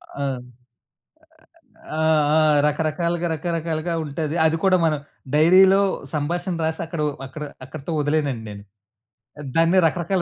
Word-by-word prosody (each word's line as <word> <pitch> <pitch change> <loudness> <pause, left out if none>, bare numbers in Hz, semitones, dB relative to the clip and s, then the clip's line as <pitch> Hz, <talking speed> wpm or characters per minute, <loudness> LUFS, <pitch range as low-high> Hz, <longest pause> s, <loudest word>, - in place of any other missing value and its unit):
ఆ! 140 -2 -2 1.4
ఆ! 155 - -9 0.4
ఆ! - - +5 0.3
రకరకాలుగా, 165 +3 -1
రకరకాలుగా 165 0 -3
ఉంటది. 155 +1 -3
అది 160 +1 +2
కూడా 190 -1 +4
మనం 155 -2 +1 0.3
డైరీలో 185 +5 +6 0.3
సంభాషణ 175 +4 -2
రాసి, 160 +1 -2
అక్కడో 160 -2 -3 0.2
అక్కడ 150 +3 -8 0.2
అక్కడితో 145 +4 -8
వదిలేనండి 145 -5 -1
నేను. 100 -1 -9 0.9
దాన్ని 165 +3 +4
రకరకాల 175 +3 -1
160 Hz, 110 wpm, -22 LUFS, 150-175 Hz, 1.4 s, డైరీలో